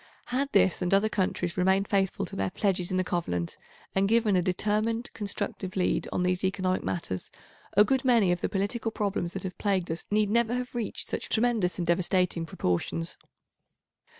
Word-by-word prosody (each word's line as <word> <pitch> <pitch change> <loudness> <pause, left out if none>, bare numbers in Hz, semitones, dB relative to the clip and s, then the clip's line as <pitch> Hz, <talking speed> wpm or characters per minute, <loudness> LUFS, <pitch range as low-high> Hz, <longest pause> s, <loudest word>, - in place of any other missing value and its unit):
Had 280 +2 0
this 190 -3 +3
and 180 +2 +3
other 210 +2 +3
countries 185 -3 -1
remained 190 +2 +3
faithful 195 -2 +1
to - - -9
their 95 0 0
pledges 185 - 0
in 185 - 0
the 185 - +2
Covenant 90 - -2 0.4
and 195 +1 +2
given 225 -3 +3
a 180 - +4
determined, 215 +6 0
constructive 200 -2 -3
lead 185 -2 0
on 180 - 0
these 180 +1 0
economic 185 0 0
matters, 95 - -3 0.5
a 210 - +9
good 260 +4 +1
many 230 -8 +4
of 175 - -1
the - - 0
political 205 +4 -1
problems 200 -5 -2
that 195 - -5
have 185 -1 -6
plagued 190 -5 0
us 165 - -5
need 210 0 +2
never 235 +1 +2
have 250 0 -4
reached 235 -4 -3
such - - -3
tremendous 220 -6 +1
and 175 - -1
devastating 175 -1 +1
proportions. 85 - -2
190 Hz, 180 wpm, -28 LUFS, 180-215 Hz, 0.5 s, a